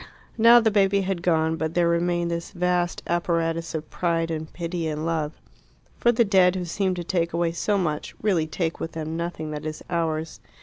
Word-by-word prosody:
Now 235 +1 +7
the 220 -2 +2
baby 200 -1 +3
had 190 -2 -2
gone, 160 -2 +1
but 160 0 -3
there 175 -1 +3
remained 170 0 +1
this 170 0 -3
vast 180 -1 -1
apparatus 165 -1 -1
of 155 0 -5
pride 165 -1 0
and 155 -1 -4
pity 170 -1 -3
and 155 0 -3
love. 160 -2 -1 0.7
For 240 - +4
the 235 0 +3
dead, 190 -2 +4
who 180 -1 -2
seemed 185 +2 -1
to 175 - -4
take 170 -1 -1
away 170 0 +1
so 200 +4 0
much, 155 -5 -2
really 185 -7 +1
take 165 0 -2
with 165 - -5
them 160 0 -4
nothing 165 -2 -4
that 150 -1 -5
is 155 0 -5
ours. 160 -2 -2
170 Hz, 200 wpm, -25 LUFS, 160-180 Hz, 0.7 s, Now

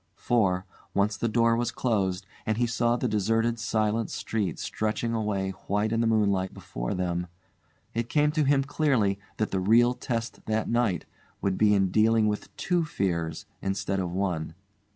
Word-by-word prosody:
For, 95 -6 +1 0.3
once 100 +1 +2
the 115 - -1
door 115 +1 +3
was 120 +1 0
closed, 95 -6 0 0.2
and 110 0 -1
he 120 - +2
saw 120 0 +1
the 125 +1 -1
deserted 115 +2 +1
silent 110 0 0
street 105 -7 -2
stretching 110 +2 -2
away 105 -4 -1 0.2
white 105 +2 +1
in 115 0 +1
the 115 - +2
moonlight 100 -4 +1
before - - -4
them, 90 -1 -1 0.7
it 115 0 -2
came 150 0 +3
to 155 0 +1
him 140 -1 +3
clearly 135 -9 +1 0.2
that 110 - -1
the 95 - 0
real 115 +6 +5
test 115 -2 -4
that 110 0 0
night 115 -8 +1 0.3
would 95 -2 0
be 105 0 +4
in 95 -2 +2
dealing 110 +1 +4
with 105 0 -2
two 175 -2 +1
fears 85 - -2 0.2
instead 95 0 -1
of 90 -2 -2
one. 85 -4 -2
110 Hz, 170 wpm, -27 LUFS, 95-115 Hz, 0.7 s, real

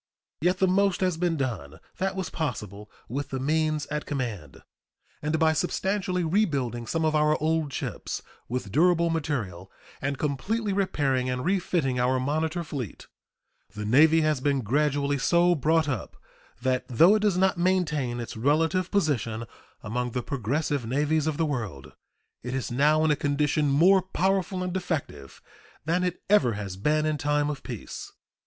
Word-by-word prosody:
Yet 180 +3 +2
the 190 - +3
most 195 +1 +2
has 185 -2 +2
been 170 -1 0
done 100 - -4 0.2
that 190 +1 -1
was 190 -3 -4
possible 105 - -4 0.2
with 140 +5 -4
the 135 - -3
means 155 +1 0
at 150 0 -3
command; 115 - -5 0.6
and 150 +2 0
by 160 0 +3
substantially 185 +2 -1
rebuilding 140 - 0
some 165 +5 0
of 155 - +2
our 150 0 +3
old 155 -1 0
ships - - -4 0.3
with 120 -4 -3
durable 170 - +3
material 110 - -3 0.3
and 140 0 -2
completely 195 - -1
repairing 140 -10 0
and 125 +1 -2
refitting 170 -8 0
our 130 +1 +2
monitor 155 +5 -1
fleet 135 - -6 0.7
the 105 0 -4
Navy 155 +8 +5
has 155 -4 +1
been 140 -1 +1
gradually 140 +3 +1
so 175 +5 +4
brought 160 +1 +2
up 130 -5 -4 0.5
that, 130 -1 +1
though 165 - +6
it 215 - +2
does 205 -4 +2
not 190 -1 +2
maintain 150 -9 +1
its 120 - -6
relative 160 +9 +1
position 120 - 0 0.4
among 125 +2 -3
the 125 - -2
progressive 140 +2 -1
navies 145 +6 0
of 155 -2 -1
the 165 - +1
world, 110 - -4 0.5
it 125 +2 -4
is 130 -1 -3
now 150 +5 +3
in 155 - +3
a - - +3
condition 145 +1 +1
more 180 +7 +5
powerful 185 0 0
and 180 0 -3
effective 155 - -4 0.4
than 175 +3 +1
it 180 -1 -3
ever 150 - +4
has 100 -2 -5
been 150 +10 +1
in 155 -1 0
time 145 +1 +1
of 145 - -7
peace. - - -7
150 Hz, 160 wpm, -26 LUFS, 125-170 Hz, 0.7 s, though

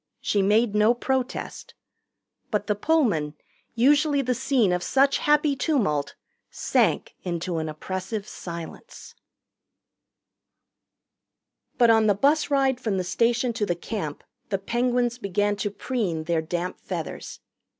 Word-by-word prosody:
She 205 - +1
made 210 +3 +3
no 215 +3 +4
protest. 260 +1 -3 0.7
But 210 -2 -1
the 210 - +1
Pullman, 205 - +1 0.4
usually 285 +3 +3
the 250 0 0
scene 245 -6 +2
of 180 - -1
such 275 +8 +2
happy 295 -1 +3
tumult, 200 - 0 0.3
sank - - 0
into 175 -1 -3
an 160 0 -3
oppressive 185 +6 -5
silence. 170 - -9 2.6
But 235 -2 +6
on 220 -1 +4
the 205 - +4
bus 290 +8 +2
ride 270 -3 +2
from 210 -4 -1
the 185 - 0
station 235 +6 +1
to 220 -2 -1
the 175 - 0
Camp 170 -4 -5 0.3
the 195 - 0
Penguins 240 +3 0
began 205 0 0
to 205 +1 -1
preen 200 -6 -2
their 165 0 0
damp 175 +3 -4
feathers. - - -6
215 Hz, 130 wpm, -25 LUFS, 180-255 Hz, 2.6 s, But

